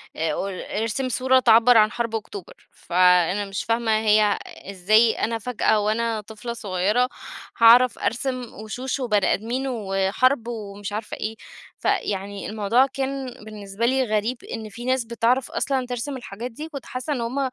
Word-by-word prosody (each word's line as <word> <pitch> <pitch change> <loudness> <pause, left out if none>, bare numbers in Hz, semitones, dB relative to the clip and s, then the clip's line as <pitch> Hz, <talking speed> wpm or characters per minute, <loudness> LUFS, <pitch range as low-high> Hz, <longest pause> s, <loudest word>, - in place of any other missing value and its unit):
أ 180 +6 -3
ارسم 255 +4 -2
صورة 260 +1 +3
تِعبّر 230 0 +6
عن 215 0 +5
حرب 230 -1 -3
أكتوبر. 410 - -8
فأنا 180 +2 +2
مش 195 0 -4
فاهمة 230 0 0
هي 210 -1 +3
إزاي 215 +4 +2
أنا 230 0 0
فجأة 220 -2 +1
وأنا 220 +1 0
طفلة 220 +3 -7
صغيرة، 210 +4 0 0.5
هاعرف 235 +1 +6
أرسم 250 +1 -2
وشوش 245 +5 -5
وبني 210 -6 +2
أدمين، 245 +6 -2
وحَرب 220 +3 0
ومش 205 -3 -6
عارفة 215 +1 -5
إيه. 220 +1 -4 0.4
فيعني 200 0 -2
الموضوع 220 +4 +2
كان 270 -1 -4
بالنسبة 210 0 -4
لي 260 +2 +2
غريب، 220 +2 -1 0.2
إن 220 -2 -6
في 235 +4 -9
ناس 255 -2 +1
بتعرف 235 +3 0
أصلًا 265 -2 -1
ترسم 250 +3 -4
الحاجات 235 +1 -7
دي، 305 +7 -8
كنت 280 -5 -8
حاسّة 255 +4 -4
إن 250 - -3
هم 245 +4 -2
230 Hz, 150 wpm, -23 LUFS, 210-255 Hz, 0.5 s, تِعبّر